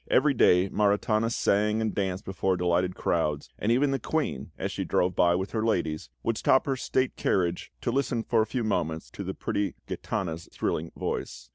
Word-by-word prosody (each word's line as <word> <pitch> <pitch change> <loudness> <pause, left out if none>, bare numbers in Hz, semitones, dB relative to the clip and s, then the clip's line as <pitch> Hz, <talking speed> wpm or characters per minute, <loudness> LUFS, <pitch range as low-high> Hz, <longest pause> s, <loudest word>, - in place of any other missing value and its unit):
Every 140 +2 +4
day 90 -6 +5
Maritana 105 +2 +2
sang 105 0 +2
and 110 -1 -1
danced 95 -1 -2
before 95 0 0
delighted 90 +1 +1
crowds; 75 -3 -1
and 110 - +1
even 135 +4 +3
the 135 - 0
Queen, 155 +5 -2
as - - -3
she - - -3
drove 90 -1 +1
by 85 -1 +4
with 95 +2 -2
her 110 -1 -1
ladies, 80 - -1
would 115 - 0
stop 130 - +4
her 135 - 0
state 130 0 0
carriage 85 -2 0
to - - 0
listen 125 -4 0
for 115 -1 +2
a 110 - 0
few 125 -3 -2
moments 80 -7 -1
to - - -6
the - - -4
pretty 100 -1 -2
Gitana's 85 -3 -4
thrilling 80 +2 -2
voice. - - -4
100 Hz, 190 wpm, -27 LUFS, 90-115 Hz, -, day